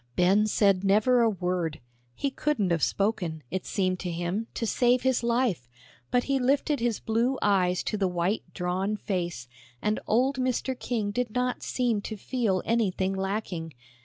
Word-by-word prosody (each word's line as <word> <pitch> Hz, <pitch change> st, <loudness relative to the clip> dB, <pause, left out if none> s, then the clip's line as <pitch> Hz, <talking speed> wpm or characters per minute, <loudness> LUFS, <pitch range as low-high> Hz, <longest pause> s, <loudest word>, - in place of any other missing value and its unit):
Ben 195 Hz, +4 st, +4 dB
said 200 Hz, -3 st, +3 dB
never 215 Hz, +5 st, +4 dB
a 230 Hz, -, +4 dB
word; 180 Hz, -5 st, -2 dB, 0.4 s
he 280 Hz, -, -1 dB
couldn't 265 Hz, -10 st, 0 dB
have 165 Hz, -2 st, +1 dB
spoken, 180 Hz, -7 st, 0 dB
it 185 Hz, -, -3 dB
seemed 185 Hz, -2 st, 0 dB
to 180 Hz, -, -4 dB
him, 175 Hz, +6 st, -2 dB
to 230 Hz, -, -1 dB
save 245 Hz, +2 st, +2 dB
his 260 Hz, -2 st, +2 dB
life, 235 Hz, -, 0 dB, 0.4 s
but 245 Hz, 0 st, +2 dB
he 275 Hz, -1 st, 0 dB
lifted 280 Hz, +2 st, +1 dB
his 235 Hz, -2 st, 0 dB
blue 235 Hz, +4 st, 0 dB
eyes 185 Hz, -3 st, +2 dB
to 215 Hz, -, -2 dB
the 195 Hz, -2 st, +1 dB
white, 180 Hz, +4 st, 0 dB
drawn 190 Hz, +3 st, -1 dB
face, 175 Hz, -, -3 dB, 0.3 s
and 210 Hz, -, 0 dB
old 260 Hz, +5 st, +2 dB
Mr. 255 Hz, +1 st, 0 dB
King 220 Hz, -4 st, -1 dB
did 245 Hz, +2 st, -1 dB
not 250 Hz, 0 st, 0 dB
seem 240 Hz, -5 st, 0 dB
to 215 Hz, +1 st, -6 dB
feel 210 Hz, -5 st, -1 dB
anything 195 Hz, -4 st, +1 dB
lacking. 190 Hz, -, -3 dB
210 Hz, 165 wpm, -27 LUFS, 185-245 Hz, 0.4 s, Ben